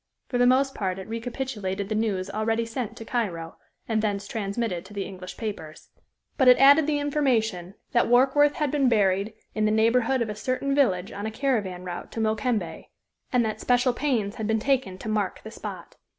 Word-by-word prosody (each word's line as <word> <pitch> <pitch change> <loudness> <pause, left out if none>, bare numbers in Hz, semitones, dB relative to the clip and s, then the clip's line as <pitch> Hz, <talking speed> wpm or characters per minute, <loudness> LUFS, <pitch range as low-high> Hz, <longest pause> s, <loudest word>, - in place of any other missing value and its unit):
For 245 - -1
the 245 - +5
most 270 +2 +3
part 190 -3 -2
it 190 - -8
recapitulated 225 -4 -4
the 215 - -2
news 210 -4 -1
already 220 +3 -1
sent 230 0 -5
to 225 - -8
Cairo, 175 -10 -3 0.3
and 220 -2 +1
thence 200 -2 -2
transmitted 200 -4 -3
to 205 +2 -13
the 200 - -2
English 185 -1 -9
papers. 200 -9 -6 0.5
But 265 - +4
it 250 - +8
added 285 +3 +6
the 300 -1 +1
information 230 - 0 0.2
that 240 - +3
Warkworth 270 +4 +4
had 300 -3 -1
been 275 -4 +3
buried 200 -1 +1 0.2
in 215 -1 0
the 215 - +2
neighborhood 230 +3 +3
of 220 - -6
a - - -3
certain 255 +5 -1
village 195 -10 +2
on 205 +1 -6
the - - -1
caravan 220 -7 -1
route 175 -1 -6
to - - -4
Mokembe, 220 +1 -1 0.5
and 245 -2 +3
that 215 0 -3
special 245 0 +2
pains 240 -7 -1
had 220 - -3
been 220 0 +2
taken 235 -5 0
to 205 - -8
mark 210 -3 -1
the 220 - -8
spot. - - -8
220 Hz, 195 wpm, -26 LUFS, 200-255 Hz, 0.5 s, it